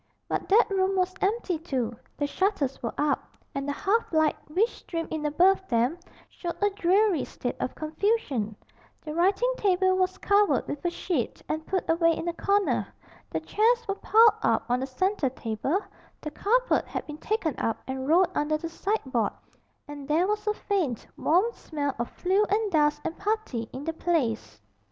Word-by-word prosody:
But - - -3
that 435 +4 +6
room 385 0 +1
was 370 0 +1
empty 390 -4 0
too 255 -8 -2 0.2
the 290 - 0
shutters 295 -4 -1
were 235 - -4
up, 295 0 -1 0.2
and 275 0 -3
the - - 0
half 415 +9 0
light 315 -2 +3
which 385 +9 +3
streamed 330 -2 -5
in 305 -1 -1
above 380 +5 +3
them 245 +8 +1 0.3
showed 345 -2 -5
a 410 0 +2
dreary 390 -2 +2
state 245 - -4
of - - -3
confusion: 310 - -1 0.5
the 305 - -4
writing 390 +9 +2
table 375 -1 +3
was 370 0 0
covered 405 0 +3
with 290 - -5
a 350 - +2
sheet 340 -7 -3
and 315 0 -3
put 375 0 -1
away 330 0 +3
in 340 - -4
a 340 - 0
corner, 400 +3 +1 0.4
the - - -2
chairs 470 +2 +2
were 395 - +1
piled 445 +3 +5
up - - +2
on 245 +1 +1
the 265 - -3
centre 345 +2 0
table, 250 - -2 0.4
the 305 - -6
carpet - - +1
had - - -4
been 300 0 -8
taken 415 -8 -1
up 225 - -1
and 265 0 -4
rolled 350 +3 +4
under 305 -1 +1
the 330 +2 -5
sideboard, 285 - -1 0.5
and 290 -1 -8
there 320 +4 +3
was 420 +1 -2
a 425 - +3
faint 345 - -1
warm 355 +6 +3
smell 285 -3 -3
of 235 - -2
flue 380 +3 +1
and 420 +1 +1
dust 295 -2 +3
and 325 - -4
putty 405 - -2
in 265 - -7
the 325 +1 -2
place. 255 - -1
340 Hz, 180 wpm, -27 LUFS, 290-400 Hz, 0.5 s, that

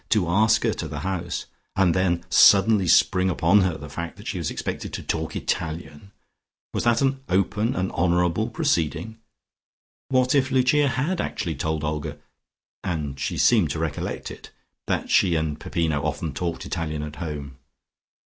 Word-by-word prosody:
To 100 -6 +2
ask 110 +6 +3
her - - +2
to - - -5
the - - -6
house, 90 -2 -3 0.3
and 95 -3 +3
then 90 -1 0
suddenly 100 -1 +6
spring 90 +2 +4
upon 90 +3 +4
her 90 -4 0
the 70 - -9
fact 85 +3 -6
that - - -12
she - - -3
was - - -2
expected - - -5
to - - -5
talk 80 0 -3
Italian.... 80 +1 -4 0.6
Was - - -2
that 120 +2 +3
an 135 0 +1
open, 105 +5 +1
an 95 +1 -1
honourable 90 +5 +1
proceeding? 85 +1 -1 0.9
What 130 -1 +2
if 135 -2 +2
Lucia 130 +3 +3
had 145 +8 -1
actually 85 -5 -3
told 80 +2 -2
Olga 75 -1 -3 0.7
(and 75 -6 -3
she - - -2
seemed 105 -10 +4
to 70 - -3
recollect 80 -2 -3
it) - - -11 0.4
that - - -1
she 90 -3 +4
and 80 -2 -1
Peppino 80 -4 -1
often 75 0 -3
talked 85 +3 -3
Italian 75 -2 -3
at 75 0 -7
home? 70 -4 -6
85 Hz, 165 wpm, -24 LUFS, 80-105 Hz, 0.9 s, suddenly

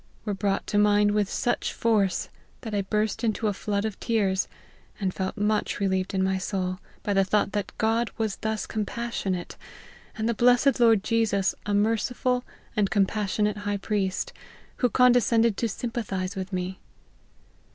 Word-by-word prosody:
were 210 - -1
brought 195 0 -1
to 205 - +1
my 210 0 +5
mind 205 0 +4
with 205 -1 +1
such 240 - 0
force, 210 -5 +1 0.3
that 220 -3 -6
I 205 - +1
burst 210 +3 -1
into 220 0 0
a 210 - +2
flood 200 +1 -2
of 215 -3 -4
tears, 195 -5 +1 0.5
and 190 -3 -1
felt 190 +2 -3
much 210 0 0
re 200 - +1
lieved 190 0 -1
in 190 - +2
my 190 0 +1
soul, 185 -1 -2 0.2
by 205 - 0
the 195 0 +4
thought 200 +1 +1
that 205 -2 -2
God 225 +1 +1
was 220 -3 -1
thus 220 -1 -2
compassionate, 210 -4 -3 0.6
and 220 0 -1
the 235 - +2
blessed 245 +4 +4
Lord 225 -4 +5
Jesus 210 -4 +1
a 205 - +1
merciful 240 +4 +1 0.3
and 205 -2 +2
compassionate 210 0 +1
High 205 0 -2
Priest, 195 -2 -2 0.4
who 250 - +2
con 250 +3 +5
descended 230 -2 +3
to 230 - 0
sympathize 200 -4 -3
with 190 0 -5
me. 185 +1 -3
210 Hz, 170 wpm, -26 LUFS, 195-225 Hz, 0.6 s, my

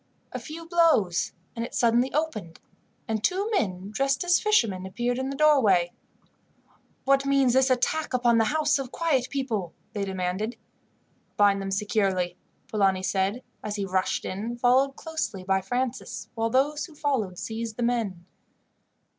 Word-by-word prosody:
A - - -4
few 330 +1 -8
blows, 325 - +3 0.2
and 230 - -3
it 235 - -6
suddenly 240 +2 +3
opened, 240 - -3 0.5
and 220 -1 -2
two 395 - 0
men 195 - -1
dressed 275 +5 0
as 350 0 +4
fishermen 230 - +2
appeared 240 +5 -2
in 265 +1 -2
the 275 - -4
doorway. 230 - +4 1.1
"What 275 0 +4
means 275 -3 +3
this 265 +1 +4
attack 260 +5 0
upon 240 -2 +3
the 225 - +4
house 300 +2 +2
of 265 -2 -5
quiet 280 -7 +1
people?" 225 - -3 0.2
they 205 - -2
demanded. 190 +4 -2 0.8
"Bind 200 -1 +4
them 195 - -4
securely," 195 -3 0 0.3
Polani 195 -3 +1
said, 195 +5 0 0.2
as 210 -1 -3
he 200 -2 -2
rushed 185 0 -1
in, 220 +5 -4
followed 260 +3 +3
closely 315 - -4
by 190 0 +1
Francis, 245 +6 -3
while 225 0 -1
those 290 +5 +1
who 320 - -16
followed 255 -12 -1
seized 225 +1 -5
the 240 - -1
men. 220 -8 -1
235 Hz, 155 wpm, -26 LUFS, 195-275 Hz, 1.1 s, as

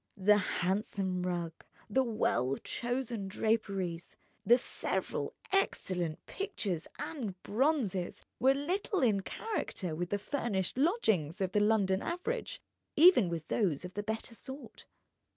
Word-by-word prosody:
The 205 +2 +5
handsome 190 0 -1
rug, 175 -2 -2 0.3
the 265 +5 +3
well 135 - +1
chosen 240 -4 -2
draperies, 195 -5 -1 0.3
the 240 - +7
several - - -2 0.2
excellent 180 - 0
pictures 205 - -3
and 215 - -4
bronzes, 220 - 0 0.2
were 265 +2 +5
little 360 - 0
in 215 -5 +4
character 190 - -3
with 175 +2 -2
the 205 - +1
furnished 205 -5 -2
lodgings 220 - +2
of 190 -2 0
the 210 - +3
London 205 -2 +3
average, 405 +8 -3 0.4
even 305 - +7
with 165 -2 -4
those 180 -7 +1
of 180 - -8
the 205 - -2
better 220 +3 -4
sort. 265 +4 -9
210 Hz, 125 wpm, -32 LUFS, 180-265 Hz, 0.4 s, the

